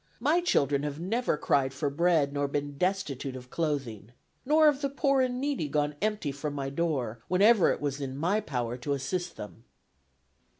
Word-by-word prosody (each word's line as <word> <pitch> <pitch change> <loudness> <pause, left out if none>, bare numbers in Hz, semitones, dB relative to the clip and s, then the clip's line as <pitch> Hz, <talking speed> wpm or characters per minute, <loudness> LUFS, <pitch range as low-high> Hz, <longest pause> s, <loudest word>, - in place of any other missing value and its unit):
My 300 +8 +2
children 140 - +2
have 145 0 -4
never 220 +1 0
cried 135 -2 +1
for 145 0 -1
bread 160 -2 +2
nor 145 0 0
been 145 0 -3
destitute 145 -6 -2
of 125 -1 -10
clothing. 135 -10 -3 0.4
Nor 310 +2 +5
have 290 -2 +4
the 280 - 0
poor 275 -1 +2
and 250 -1 0
needy 275 - -1
gone 150 0 0
empty 210 -8 -1
from 145 +1 -5
my 135 -1 -3
door, 135 -8 -2
whenever 200 +2 +5
it - - -2
was 145 -1 -2
in 135 -1 -4
my 180 +8 +1
power 125 - -3
to 135 +3 -2
assist 170 +6 -3
them." 105 +2 -9
150 Hz, 180 wpm, -29 LUFS, 135-205 Hz, 0.4 s, Nor